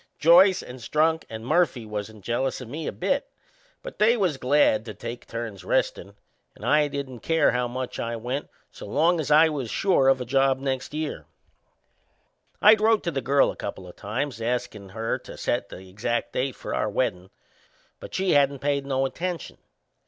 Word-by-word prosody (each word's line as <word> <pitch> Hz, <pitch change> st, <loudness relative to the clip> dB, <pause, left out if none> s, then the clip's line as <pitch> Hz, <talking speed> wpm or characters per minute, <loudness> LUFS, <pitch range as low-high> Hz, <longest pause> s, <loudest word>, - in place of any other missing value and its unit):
Joyce 180 Hz, +4 st, +6 dB
and 125 Hz, +1 st, -10 dB
Strunk 160 Hz, +6 st, +1 dB
and 110 Hz, 0 st, -7 dB
Murphy 130 Hz, -5 st, +1 dB
wasn't 105 Hz, 0 st, -6 dB
jealous 125 Hz, +5 st, -1 dB
o' 125 Hz, -, -7 dB
me 150 Hz, +7 st, -6 dB
a -, -, -1 dB
bit; -, -, -1 dB, 0.5 s
but -, -, -9 dB
they 230 Hz, +3 st, +4 dB
was 180 Hz, -9 st, +1 dB
glad 130 Hz, -5 st, +3 dB
to 110 Hz, -3 st, -7 dB
take 115 Hz, +4 st, -7 dB
turns 115 Hz, -5 st, -6 dB
restin', 100 Hz, +2 st, -1 dB, 0.4 s
and -, -, -10 dB
I 150 Hz, -1 st, +4 dB
didn't 140 Hz, -3 st, -6 dB
care 160 Hz, +6 st, +2 dB, 0.2 s
much 125 Hz, +1 st, -5 dB
how -, -, -2 dB
I 115 Hz, -, -3 dB
went 125 Hz, +5 st, -4 dB, 0.2 s
so -, -, -10 dB
long 165 Hz, +4 st, +2 dB
as 155 Hz, -, -3 dB
I 155 Hz, +2 st, +7 dB
was 140 Hz, -6 st, -4 dB
sure 135 Hz, -, +2 dB
of 135 Hz, -1 st, +4 dB
a 125 Hz, -, -4 dB
job 135 Hz, +1 st, +2 dB
next 135 Hz, +1 st, -3 dB
year. 155 Hz, -1 st, -4 dB, 1.4 s
I'd 215 Hz, 0 st, +7 dB
wrote 220 Hz, -1 st, +3 dB
to 170 Hz, -, -1 dB
the 135 Hz, -, -2 dB
girl 135 Hz, +3 st, +3 dB
a -, -, -11 dB
couple 95 Hz, -, -6 dB
o' 90 Hz, -, -10 dB
times 115 Hz, +6 st, -4 dB
askin' 115 Hz, -4 st, -3 dB
her 110 Hz, +3 st, -2 dB
to -, -, -11 dB
set -, -, -1 dB
the 95 Hz, +1 st, -11 dB
exact 105 Hz, +5 st, -3 dB
date 130 Hz, 0 st, -1 dB
for -, -, -6 dB
our 110 Hz, -, 0 dB
weddin'; 95 Hz, -5 st, -2 dB, 0.7 s
but -, -, -9 dB
she 190 Hz, 0 st, +1 dB
hadn't 140 Hz, -1 st, +3 dB
paid 140 Hz, 0 st, -1 dB
no 135 Hz, -1 st, +1 dB
attention. 175 Hz, +5 st, -4 dB
135 Hz, 190 wpm, -25 LUFS, 115-155 Hz, 1.4 s, I